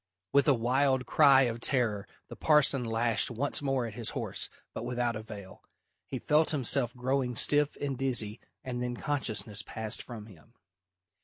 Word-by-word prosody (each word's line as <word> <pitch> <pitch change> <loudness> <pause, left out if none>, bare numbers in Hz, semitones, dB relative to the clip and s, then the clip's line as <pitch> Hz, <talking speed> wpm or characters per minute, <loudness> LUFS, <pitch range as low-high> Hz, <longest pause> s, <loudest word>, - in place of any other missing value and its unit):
With 140 -1 +4
a 140 - +5
wild 130 +2 +1
cry 140 -3 +5
of 120 -2 -2
terror 115 -6 0 0.2
the - - -10
parson 150 -4 +3
lashed 115 -1 +1
once 140 +5 -2
more 135 -3 0
at 115 - -7
his 115 0 -3
horse, - - -2 0.2
but - - -5
without 120 -1 -1
avail. 105 -3 -10 0.4
He - - -4
felt 155 +1 +2
himself 130 -3 0
growing 125 0 -1
stiff 145 +5 +3
and 135 -2 -3
dizzy 120 -6 +1 0.2
and 125 -1 -4
then 125 0 -3
consciousness 110 -8 -1
passed 110 +1 -4
from 115 -4 -9
him. 110 +3 -18
125 Hz, 160 wpm, -29 LUFS, 115-135 Hz, 0.4 s, a